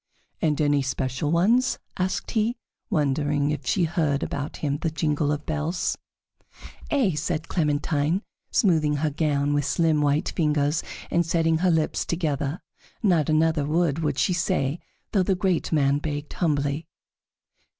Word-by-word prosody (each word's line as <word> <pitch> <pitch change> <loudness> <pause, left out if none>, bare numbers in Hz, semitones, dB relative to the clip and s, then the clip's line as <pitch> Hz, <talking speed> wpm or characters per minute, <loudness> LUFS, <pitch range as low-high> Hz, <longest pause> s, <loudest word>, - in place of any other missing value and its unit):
"And 150 -2 +1
any 145 -2 +3
special 135 +1 -2
ones?" 225 +10 +3 0.2
asked 185 +1 -2
he, 225 +1 +1 0.3
wondering 145 - +1
if 150 - -4
she 185 - +2
heard 155 -4 0
about 140 +1 -4
him 145 -1 -2
the 165 - 0
jingle 150 -2 0
of 150 0 -3
bells. 160 +3 -1 0.9
"Ay," 265 -10 +2
said 160 +1 -2
Clementine, 150 +2 0 0.3
smoothing 155 -6 +2
her 150 +1 0
gown 145 -1 0
with 145 0 +1
slim 155 +2 +2
white 145 +4 +1
fingers 150 -2 +1 0.3
and 170 - +3
setting 165 -1 +1
her 185 +1 +3
lips 160 -2 +1
together. 150 -2 -2 0.4
Not 170 -8 +3
another 155 -1 +2
word 160 -1 +1
would 150 -4 -1
she 180 - +2
say, 175 -4 0 0.3
though 200 - +3
the 185 +1 +1
great 185 -2 0
man 140 -2 +3
begged 145 -1 -4
humbly. 145 -2 0
155 Hz, 145 wpm, -25 LUFS, 145-170 Hz, 0.9 s, any